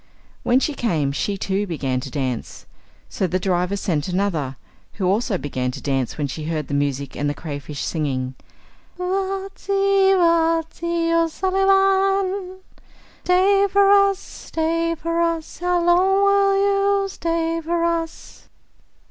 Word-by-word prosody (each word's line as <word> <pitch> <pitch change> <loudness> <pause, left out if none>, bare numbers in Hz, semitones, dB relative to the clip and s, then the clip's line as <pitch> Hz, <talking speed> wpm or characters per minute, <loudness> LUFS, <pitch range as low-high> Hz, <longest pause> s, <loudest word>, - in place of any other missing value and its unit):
When 245 +2 +3
she 300 - -1
came, 160 - 0
she 200 +8 -2
too 195 +1 -1
began 135 -7 -2
to - - -7
dance. 130 -5 -4 0.4
So 190 - -2
the 180 +2 -1
driver 180 +1 0
sent 160 -6 -1
another, 175 -8 -1 0.4
who 195 - -3
also 200 +2 +1
began 130 -5 -3
to 140 - -7
dance 135 -4 -2
when 150 - -1
she 150 +3 -5
heard 155 -2 -3
the - - -4
music 140 -1 -1
and 145 0 -1
the 145 - -3
cray 145 -2 -6
fish 145 0 -6
singing: 130 -5 -2 0.6
Vaitsi, 390 +1 +1
Vaitsi, 335 0 +1
O 335 0 +3
sulli 380 +4 0
Van. 390 -1 +2 0.6
Stay 390 +2 +4
for 400 0 +5
us, 395 -1 +5
stay 330 -2 -2
for 335 +1 -2
us, 335 -2 -2
how 355 0 +1
long 380 +3 +4
will 400 0 +4 0.5
you - - -2
stay 330 -3 -2
for 335 +1 -1
us? 335 -1 -4
330 Hz, 145 wpm, -21 LUFS, -, 0.6 s, for